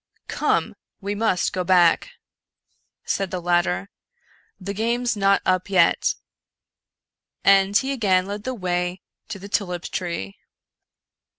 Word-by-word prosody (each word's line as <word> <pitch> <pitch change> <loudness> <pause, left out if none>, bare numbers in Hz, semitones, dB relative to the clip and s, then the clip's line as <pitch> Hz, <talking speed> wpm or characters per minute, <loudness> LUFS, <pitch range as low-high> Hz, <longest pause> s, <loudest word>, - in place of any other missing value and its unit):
" - - -43
Come! - - 0 0.3
we 200 0 -3
luust 205 -4 0
go 185 - -1
back," 175 - +4 1.0
said 195 -1 -1
the 185 - -3
latter, 175 - 0 0.3
" - - -38 0.3
the 200 +1 -5
game's 235 +3 0
not 195 -1 +2
up 185 +1 +1
yet; 190 -2 +3 0.6
" - - -60
and 195 +1 +5
he 265 +6 -1
again 195 -8 +2
led 205 +1 -6
the 255 +1 -3
way 180 -2 -2 0.2
to 220 -2 -6
the 195 +1 -10
tulip 180 -4 -2
tree. 170 - -5
190 Hz, 135 wpm, -23 LUFS, 180-205 Hz, 1.0 s, and